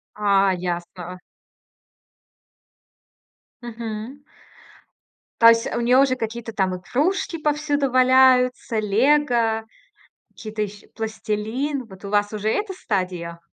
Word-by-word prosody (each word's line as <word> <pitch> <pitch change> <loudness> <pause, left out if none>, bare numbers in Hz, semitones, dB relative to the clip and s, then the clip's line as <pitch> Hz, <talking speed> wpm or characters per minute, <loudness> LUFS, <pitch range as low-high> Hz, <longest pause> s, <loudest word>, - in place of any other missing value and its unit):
А, 200 -2 +3
ясно. 175 0 -5 2.4
Мгм. 235 +3 -7 1.2
То 230 - +9
есть 230 0 +4
у - - -1
нее 250 +2 +4
уже 270 -2 +3
какие-то 225 0 -5
там 190 -2 0
игрушки 310 - -1
повсюду 295 -2 0
валяются, 255 -2 +4
"Лего", 230 0 +2 0.7
какие-то 215 -1 -7
ещ 205 0 -9
пластилин. 225 +5 -3
Вот 190 -2 -15
у - - -5
вас 205 0 +1
уже 215 0 -2
эта 410 - -1
стадия? 180 - -3
225 Hz, 100 wpm, -22 LUFS, 205-260 Hz, 2.4 s, То